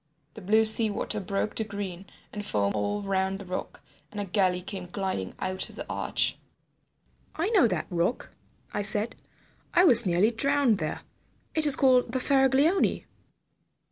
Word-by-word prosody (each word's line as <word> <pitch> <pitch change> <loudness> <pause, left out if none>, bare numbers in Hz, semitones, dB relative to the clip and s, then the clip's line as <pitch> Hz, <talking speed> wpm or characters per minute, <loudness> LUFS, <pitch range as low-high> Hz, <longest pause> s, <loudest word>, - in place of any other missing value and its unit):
The 215 - -11
blue 215 +4 +2
sea 220 0 +3
water 210 - -3
broke 195 +2 -3
to 220 - -1
green 200 -3 -7 0.3
and 210 - -6
foam 100 - -1
all 105 - -3
round 190 0 -1
the 200 - -11
rock, 180 0 -7 0.3
and 205 - -8
a 205 - -3
galley 185 -2 0
came 190 -1 -7
gliding 185 - -4
out 185 0 -4
of - - -14
the - - -7
arch." - - 0 1.0
"I 340 +6 -1
know 395 - +4
that - - -2
rock." 175 +7 -2 0.4
I 205 - -2
said. 210 +2 0 0.6
"I 355 - +5
was 240 - +7
nearly 180 +6 +2
drowned 275 -2 +2
there. - - -4 0.5
It 315 -1 +2
is 290 - +10
called 250 -3 +2
the 260 - +1
Faraglioni." 275 +7 +2
205 Hz, 165 wpm, -26 LUFS, 190-250 Hz, 1.0 s, is